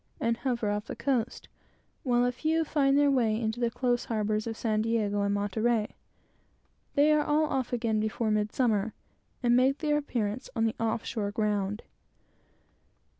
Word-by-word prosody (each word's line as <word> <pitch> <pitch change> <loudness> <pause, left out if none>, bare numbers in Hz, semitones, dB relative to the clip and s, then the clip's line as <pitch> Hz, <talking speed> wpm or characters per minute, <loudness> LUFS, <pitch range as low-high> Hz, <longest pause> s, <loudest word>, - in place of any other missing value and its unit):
and 230 0 0
hover 235 -6 -1
off 210 +1 -2
the - - -5
coast, 250 -4 -1 0.5
while 245 -2 +2
a 245 - +2
few 320 +6 0
find 280 -2 +2
their 290 -1 +4
way 225 -5 +2
into 220 0 -2
the 240 -1 +1
close 245 0 0
harbors 215 -1 -1
of 225 -1 -4
San 215 -2 0
Diego 215 -2 0
and 200 0 +1
Monterey. 215 +2 0 1.0
They 290 +2 +5
are 300 -1 +4
all 300 +1 +2
off 265 -4 -2
again 230 -3 0
before 220 +1 -1
midsummer, 215 0 0 0.5
and 240 0 +4
make 260 +3 +3
their 295 -2 +1
appearance 235 -5 -3
on 225 -1 +2
the 225 - +1
"off 225 0 -1
shore 215 -4 -2
ground." 210 -1 -1
230 Hz, 165 wpm, -29 LUFS, 215-255 Hz, 1.0 s, They